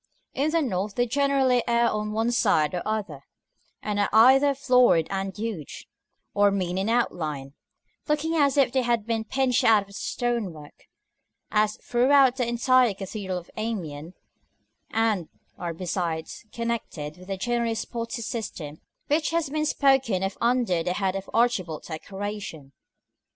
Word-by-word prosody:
In 280 +4 0
the 330 0 +1
North 200 -4 -2
they 245 - +2
generally 265 -1 +2
err 235 0 +3
on 210 -1 -2
one 225 +2 0
side 155 -10 +2
or 180 - -2
other, 200 -10 -3 0.6
and 205 -1 -2
are 205 - +2
either 265 +6 +6
florid 250 - +4
and 195 0 -3
huge, 210 -9 -6 0.5
or 205 0 +4
mean 185 -2 -1
in 195 +3 -1
outline, 155 - -1 0.5
looking 300 +2 0
as 285 -3 +2
if 270 -3 +4
they 260 - +2
had 235 -3 0
been 225 -1 -1
pinched 260 +1 +1
out 215 -3 +5
of 200 - -21
the - - -15
stonework, 200 - -4 0.7
as 215 0 +2
throughout 260 +1 +3
the 245 -3 0
entire 240 -1 +3
cathedral 195 -1 -5
of 175 - -10
Amiens; 175 -8 -4 0.7
and 220 -7 0 0.3
are 175 -1 -3
besides 170 +2 -4
connected 225 -10 -4
with 185 0 -14
the 195 -1 -3
generally 235 +2 -1
spotty 230 +1 -4
system 165 -11 -6 0.2
which 305 +2 +1
has 330 -4 -1
been 305 0 0
spoken 265 -10 +2
of 195 0 -2
under 235 -7 +2
the 180 +2 -1
head 190 -1 -1
of 195 0 -5
archivolt 190 -10 0
decoration. 190 -3 -6
220 Hz, 150 wpm, -25 LUFS, 185-245 Hz, 0.7 s, either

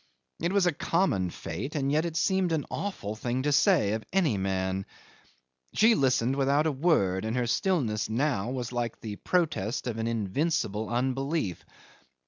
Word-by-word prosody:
It 170 +2 0
was 200 -2 +3
a 175 - +4
common 145 - 0
fate, 100 - -6
and 140 -2 0
yet 155 +3 +2
it 165 -1 -3
seemed 190 -2 +2
an 155 -3 -1
awful 150 - -4
thing 120 +3 -2
to 145 - +1
say 155 - +4
of 110 0 -3
any 175 - +2
man. 95 0 -1 0.9
She 225 +2 +6
listened 130 - +2
without 140 +2 +2
a 160 - +2
word, 130 - +1
and 110 +3 -2
her 125 - +1
stillness 120 - 0
now 120 -3 0
was 125 -2 -4
like 120 -2 -3
the 105 -2 -6
protest 155 - 0
of 115 -3 -3
an 110 - -1
invincible 110 - -1
unbelief. 130 - -1
130 Hz, 165 wpm, -28 LUFS, 110-160 Hz, 0.9 s, She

